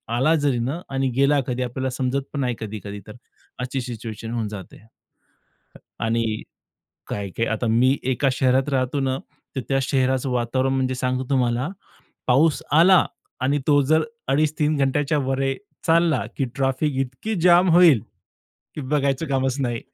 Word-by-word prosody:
आला 145 +6 +3
जरी 140 -5 +1
ना 135 +8 -2
आणि 135 0 0
गेला 140 +1 +4
कधी 125 0 -2
आपल्याला 130 +2 -3
समजत 130 +2 -1
पण 145 - -3
नाही 125 -2 0
कधी-कधी 105 -1 -6
तर. 105 - -9 0.5
अशी 125 +1 -3
सिच्युएशन 115 -2 -6
होऊन 115 -3 -2
जाते. 100 -4 -9
अ, 110 - -21 1.2
आणि 115 -1 0 0.7
काय-काय 100 +3 -3
आता 115 +2 -2
मी 125 +5 +3
एका 135 +2 +1
शहरात 130 +2 +2
राहतो 135 +1 0
ना, 135 -1 0 0.4
तर 130 - -1
त्या 135 0 +2
शहराचं 130 0 +1
वातावरण 130 +2 0
म्हणजे 130 -1 0
सांगतो 130 0 -1
तुम्हाला, 125 0 +1 0.6
पाऊस 145 +5 +3
आला 175 +4 +6 0.4
आणि 140 +3 +1
तो 145 -1 +5
जर 155 +3 +3 0.3
2.5-3 150 +1 +1
घंट्याच्यावर 135 -1 0 0.4
चालला 165 -4 +3
की 135 - 0
ट्रॅफिक 135 +2 0
इतकी 135 - -5
जाम 180 +1 +6
होईल 165 - +7 0.8
की 150 - -4
बघायचं 140 +2 0
कामच 135 0 0
नाही. 120 -2 -2
130 Hz, 145 wpm, -23 LUFS, 125-145 Hz, 1.2 s, होईल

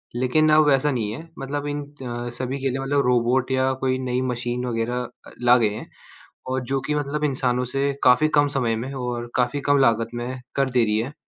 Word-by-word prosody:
लेकिन 130 +6 +2
अब 155 0 +6
वैसा 145 +1 +3
नहीं 110 -5 -2
हैं 165 +8 -9
मतलब 145 +2 -4
इन 145 0 -3 0.5
सभी 130 +2 -3
के 135 - +1
लिए 130 - -3
मतलब 140 +1 +1
रोबोट 125 +2 +2
या 130 0 +2
कोई 130 -1 +1
नई 125 -1 -1
मशीन 120 +1 -3
वग़ैरह 120 +1 -1 0.3
अ, - - -12
ला 125 0 +6
गए 115 -3 +2
हैं - - -8 0.6
और 130 0 0
जो 135 - +2
कि 150 - -2
मतलब 150 +1 -2
इंसानों 125 -3 0
से 135 +3 0
काफ़ी 125 +5 +5
कम 145 - +4
समय 115 -4 +1
में 130 +4 -5
और 120 -2 -4
काफ़ी 125 +3 +1
कम 145 - +5
लागत 115 -3 +3
में 125 +2 -5
कर 135 -1 +1
दे 125 -1 +3
रही 105 0 +1
हैं। 125 +6 -4
130 Hz, 215 wpm, -23 LUFS, 120-140 Hz, 0.6 s, अब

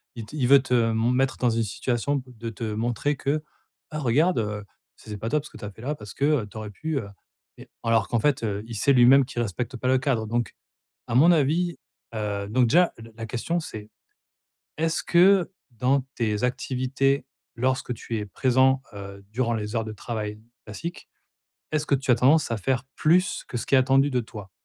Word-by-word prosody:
il 115 - -6
t 110 - -11
il 125 - +1
veut 140 +1 +7
te 125 -3 +2
mon 115 +2 +1
mettre 130 +1 +1
dans 125 - +2
une 115 0 +1
situation 125 +6 -1
de 115 -2 -7
te 110 +1 -8
montrer 120 +6 -1
que: 150 +3 -1 0.5
«Ah, 155 - -3
regarde, 145 +6 +2
heu, 105 -1 -3 0.3
c 110 - -15
c'est 105 - -4
pas 110 +3 -4
top 150 +2 0
ce - - -10
que - - -13
tu - - -8
as 105 - -6
fait 110 - -15
là 145 +4 -2
parce 105 -8 -10
que, 140 - 0
heu, 145 -8 +2
tu 105 - -11
aurais 110 -1 -5
pu, 155 +7 -3
heu» 100 - -6 0.5
mais - - -13
alors 115 -2 +2
qu'en 120 - +1
fait, 135 0 +1
heu, 105 -1 -2
il 115 - -7
sait, 135 +6 +3
lui-même, 130 +2 +6
qu'il 120 - -4
respecte 120 +4 -3
pas 125 - -3
le 130 - +4
cadre. 130 -5 0
Donc 120 -1 -1 0.5
à 120 - -2
mon 165 +7 +7
avis, 165 +3 +2 0.4
heu 100 -2 -2
donc 125 +2 +3
déjà, 175 +5 +4
la 115 0 -12
la 115 - -6
question, 125 +10 -2
c'est: 110 -9 -8 0.9
«Est-ce 160 0 0
que, 180 +1 +5 0.2
dans 125 +4 +2 0.2
tes 110 -1 0
activités, 130 +2 0 0.3
lorsque 130 0 0
tu 115 0 -5
es 105 - -4
présent, 130 +5 +2
heu, 100 0 -9
durant 120 0 0
les 105 +1 -3
heures 115 - 0
de 110 - -6
travail 105 -1 -5 0.2
classiques, 165 - -7 0.6
est-ce 155 0 0
que - - +2
tu 135 0 -2
as - - +7
tendance 140 +4 +4
à 115 - 0
faire 130 +5 -1
plus 180 +4 +2
que 125 - -5
ce 115 - -4
qui - - +1
est - - +8
attendu 135 +2 +3
de 125 -2 +1
toi?» 105 -4 -9
125 Hz, 215 wpm, -25 LUFS, 110-140 Hz, 0.9 s, est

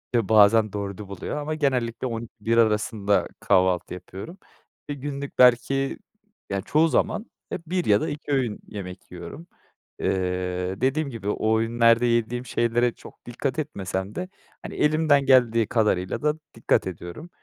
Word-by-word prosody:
e, 115 -5 +1
bazen 110 0 +5
4'ü 100 0 -5
buluyor 100 +9 -5
ama 155 +1 -3
genellikle 130 -5 0
12-1 115 -1 -3
arasında 105 -2 +2
kahvaltı 90 -1 +2
yapıyorum. 95 - -9 0.5
Eee, 145 - -2
günlük 140 0 -6
belki, 130 +2 +4 0.5
ya, 100 -1 -1
çoğu 155 - +3
zaman 210 - 0 0.3
ya - - -3
1 180 0 -1
ya 105 0 +4
da - - -1
2 145 0 -6
öğün 125 -6 0
yemek 90 -3 -8
yiyorum. 90 - -9 0.5
Eee, 90 +1 -2
dediğim 140 +3 +1
gibi 110 -5 -5
o 110 +1 +1
öğünlerde 115 +1 +3
yediğim 120 +1 0
şeylere 120 0 +1
çok - - -15
dikkat 130 +5 -3
etmesem 95 -8 -4
de, 180 0 -4 0.3
hani, - - -7
elimden 150 -2 +3
geldiği 120 -4 +4
kadarıyla 105 -4 0
da 150 0 +2 0.2
dikkat 115 - +1
ediyorum 90 - -8
115 Hz, 145 wpm, -25 LUFS, 100-135 Hz, 0.5 s, bazen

